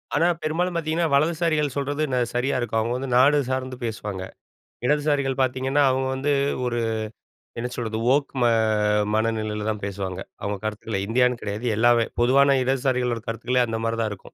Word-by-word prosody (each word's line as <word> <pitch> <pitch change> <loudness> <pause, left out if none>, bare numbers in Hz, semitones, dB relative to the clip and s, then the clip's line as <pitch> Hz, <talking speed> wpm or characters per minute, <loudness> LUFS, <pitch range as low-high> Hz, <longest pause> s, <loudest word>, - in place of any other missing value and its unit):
ஆனா, 165 +4 +3 0.2
பெரும்பாலும் 175 +3 -1
பாத்தீங்கன்னா, 165 +1 0
வலதுசாரிகள் 155 0 +2
ந - - -11
சொல்றது 145 +2 -1 0.3
சரியா 125 +3 0
இருக்கும். 115 -2 -1
அவங்க 115 +2 -1
வந்து 135 0 -4
நாடு 145 +3 +5
சார்ந்து 130 -1 -3
பேசுவாங்க. 105 -4 -4 0.6
இடதுசாரிகள் 145 -2 +1
பாத்தீங்கன்னா, 130 +3 +1
அவங்க 130 0 0
வந்து, 140 +2 0 0.3
ஒரு 120 -1 -1 0.8
என்ன 125 +1 -3
சொல்றது? 110 -2 -3 0.2
ஓக் 145 -1 0
ம - - +4 0.7
மனநிலையில 110 -1 -1
தான் 105 -2 -3
பேசுவாங்க. 95 -2 -4 0.2
அவங்க 100 0 -2
கருத்துக்கள 110 -1 -3
இந்தியான்னு 125 +1 +2
கிடையாது. 105 +4 -4
எல்லாவே. 120 0 +4 0.2
பொதுவான 140 +2 +5
இடதுசாரிகளோட 125 -3 0
கருத்துக்களே, 120 +2 0
அந்த 110 0 -3
மாதிரி 115 0 -1
தான் 110 - 0
இருக்கும். 100 - -7
125 Hz, 155 wpm, -24 LUFS, 110-140 Hz, 0.8 s, நாடு